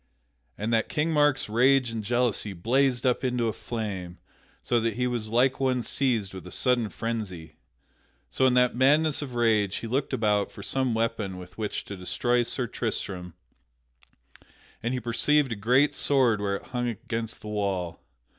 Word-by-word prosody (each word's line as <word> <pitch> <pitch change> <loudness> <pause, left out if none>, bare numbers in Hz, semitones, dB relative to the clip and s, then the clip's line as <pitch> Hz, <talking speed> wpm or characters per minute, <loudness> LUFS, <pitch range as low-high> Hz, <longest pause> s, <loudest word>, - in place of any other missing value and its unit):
At 110 +3 -2
that 115 -1 +1
King 155 +2 0
Mark's 145 -3 +3
rage 125 +3 +3
and 115 -1 -4
jealousy 120 -2 0
blazed 125 +7 +1
up 125 0 +2
into 125 -2 0
a 110 - -1
flame, 100 -7 -5 0.5
so 120 - +2
that 115 -2 -1
he 125 +1 0
was 120 -3 -2
like 125 +3 +2
one 130 -2 +1
seized 115 -6 0
with 95 -1 -9
a - - -10
sudden 125 -4 +1
frensy. 95 -6 -5 0.7
So, 130 - +3
in 125 - +3
that 125 -1 +3
madness 150 +4 +3
of 130 -4 -6
rage, 110 -5 +2
he - - -4
looked 130 +5 -1
about 105 -2 +1
for 100 - -10
some 130 0 0
weapon 110 -4 -1
with 90 0 -11
which 105 -1 -3
to 100 - -7
destroy 120 +6 0
Sir 120 +1 -1
Tristram, 95 -7 -4 1.5
and 120 +3 -1
he - - -1
perceived 130 +4 +2
a - - -1
great 125 +8 +3
sword 125 -7 +2
where 100 -1 0
it - - -6
hung 120 0 0
against 115 0 -4
the 105 - -7
wall. 100 -5 -2
115 Hz, 175 wpm, -27 LUFS, 105-125 Hz, 1.5 s, Mark's